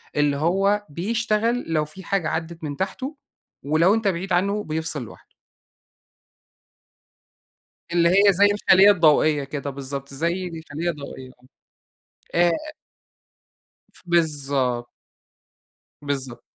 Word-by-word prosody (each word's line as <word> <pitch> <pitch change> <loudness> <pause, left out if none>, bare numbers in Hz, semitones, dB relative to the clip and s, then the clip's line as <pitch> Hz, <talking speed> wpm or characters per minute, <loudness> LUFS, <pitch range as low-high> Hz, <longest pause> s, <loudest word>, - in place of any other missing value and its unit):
اللي 145 -1 +2
هو 195 +6 +1
بيشتغل 225 +7 0
لو 155 -1 +1
في 190 +6 -12
حاجة 180 -3 -1
عدّت 165 0 -5
من 145 -2 -5
تحته 255 +10 -4 0.5
ولو 160 +7 +3
أنت 225 -2 0
بعيد 185 0 -1
عنّه 200 +4 +1
بيفصِل 160 -4 -2
لوحده. 115 - -15 2.6
اللي 170 -1 +4
هي 200 +2 +5
زي 200 +3 +4
الخليّة 205 -1 +5
الضوئية 155 -4 +3
كده 140 0 -5
بالضبط، 140 0 -6
زي 170 +6 -1
الخليّة 165 0 -5
الضوئية، 140 -4 -7 1.0
آه، - - +2
آآ 305 - -4 1.2
ف - - -14
بالضبط. 140 -8 0 1.1
بالضبط. 135 -4 -4
170 Hz, 110 wpm, -23 LUFS, 145-195 Hz, 2.6 s, هي